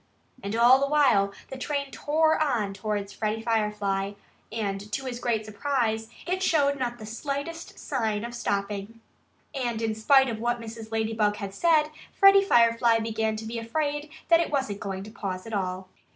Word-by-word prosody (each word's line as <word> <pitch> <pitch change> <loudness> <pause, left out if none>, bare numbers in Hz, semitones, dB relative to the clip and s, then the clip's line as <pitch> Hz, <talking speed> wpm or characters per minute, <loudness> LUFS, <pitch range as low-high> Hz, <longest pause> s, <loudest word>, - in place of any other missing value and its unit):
And 200 0 -3
all 240 +3 +6
the 280 - +1
while 255 -10 +3 0.2
the 265 - -7
train 280 0 -2
tore 315 +1 +2
on 235 -10 0
towards 200 0 -3
Freddie 220 0 -2
Firefly. 210 -3 0 0.4
To 210 +3 -3
his 245 -2 -4
great 225 -3 -1
surprise 225 -1 -1 0.2
it 370 +1 -1
showed 285 -6 +2
not 240 -2 -2
the 215 - -9
slightest 285 +8 -5
sign 225 -6 -2
of 240 - -7
stopping. 205 -1 -3 0.5
And 240 -5 -2
in 225 -1 -1
spite 265 +5 +4
of 225 -3 -3
what 240 +1 0
Mrs. 225 -1 -9
Ladybug 220 -1 +1
had 200 -2 -6
said, 310 +4 +3 0.2
Freddie 395 0 +7
Firefly 230 -7 +4
began 220 -1 -1
to 220 +1 -6
be 230 +1 -4
afraid 295 +5 -2 0.2
that 335 -1 +7
it 335 - 0
wasn't 265 -9 -1
going 195 -3 -4
to 215 - -10
pause 185 -4 -5
at 225 - -8
all. 185 -1 -2
230 Hz, 170 wpm, -27 LUFS, 210-275 Hz, 0.5 s, Freddie